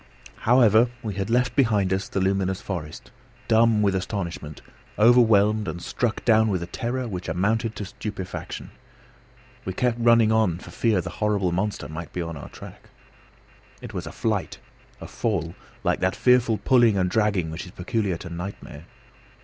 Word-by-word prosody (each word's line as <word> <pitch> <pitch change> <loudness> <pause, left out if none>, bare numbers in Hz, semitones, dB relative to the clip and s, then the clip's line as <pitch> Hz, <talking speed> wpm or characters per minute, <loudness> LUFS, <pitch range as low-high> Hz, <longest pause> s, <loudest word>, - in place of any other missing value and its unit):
However, 120 -1 +5
we 110 -3 -3
had 95 +2 -3
left 125 +1 +1
behind 105 -8 +2
us 95 +1 -2
the - - -2
luminous 95 0 0
forest, 85 -2 -7 0.4
dumb 110 -1 +4
with 100 -1 +2
astonishment, 90 -5 -4 0.4
overwhelmed 110 -2 +4
and 80 +2 -4
struck 115 +6 -2
down 110 -1 +5
with 95 -5 -1
a - - -4
terror 120 +7 -3
which 90 -4 -5
amounted 110 +6 0
to 105 - -5
stupefaction. 100 -2 -7 0.9
We 95 - -4
kept 120 +3 0
running 115 -2 +5
on 110 -7 +2
for - - -12
fear 110 -6 +1
the - - -6
horrible 100 -4 +1
monster 95 +4 -2
might 80 +1 -7
be 90 - -3
on 85 -1 -6
our 70 - -9
track. - - -13 0.9
It - - -9
was - - -5
a - - -6
flight, - - -2 0.4
a - - -8
fall, 85 -8 -2 0.3
like - - +1
that 95 -1 0
fearful 125 -3 +3
pulling 120 -5 +4
and 90 -1 +2
dragging 100 -5 0
which 80 +4 -6
is - - -11
peculiar 95 0 -2
to 85 - -9
nightmare. 85 -3 -7
100 Hz, 165 wpm, -24 LUFS, 90-115 Hz, 0.9 s, However